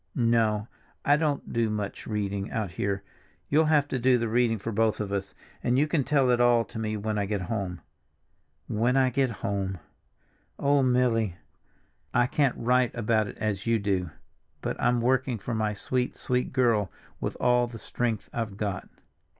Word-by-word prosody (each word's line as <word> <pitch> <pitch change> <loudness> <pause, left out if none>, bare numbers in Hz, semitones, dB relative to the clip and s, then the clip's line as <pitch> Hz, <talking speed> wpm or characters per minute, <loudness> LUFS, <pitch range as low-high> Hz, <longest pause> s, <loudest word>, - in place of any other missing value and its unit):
No, 115 -3 +2 0.4
I 145 - +6
don't 150 -2 -1
do 115 -1 +1
much 105 -1 -4
reading 100 -1 -2
out 110 -6 -2
here; 100 +3 -2 0.5
you'll 155 +2 +4
have 150 -2 +3
to 130 - -1
do 125 +1 +4
the 115 -1 -1
reading 115 0 +2
for 115 +3 -4
both 110 0 +1
of 105 -2 -3
us, 100 -1 -3 0.3
and 125 +1 +2
you 145 - +4
can 155 -2 +1
tell 135 -2 +3
it 120 0 +3
all 120 -1 +4
to 115 - -8
me 110 -1 -2
when 105 0 -2
I 100 - -1
get 100 -1 -1
home. 90 -2 -3 0.9
When 120 +5 +1
I 130 -1 +4
get 135 +1 +2 0.2
home. 95 -1 -1 0.8
Oh, 140 0 +3
Milly! 125 -6 +2 0.8
I 120 - +5
can't 140 -1 +1
write 125 +1 +2
about 110 -2 +1
it - - -9
as 105 -1 -2
you 115 0 +3
do, 95 -4 -1 0.5
but - - -2
I'm 120 0 +2
working 130 0 +1
for 115 +4 -5
my 110 -1 0
sweet, 125 +4 -2
sweet 125 0 -1
girl 115 -7 +2 0.3
with - - -3
all 125 0 +3
the 120 -1 -8
strength 115 -1 -2
I've 110 -4 -3
got." 100 -3 -3
115 Hz, 180 wpm, -27 LUFS, 105-125 Hz, 0.9 s, I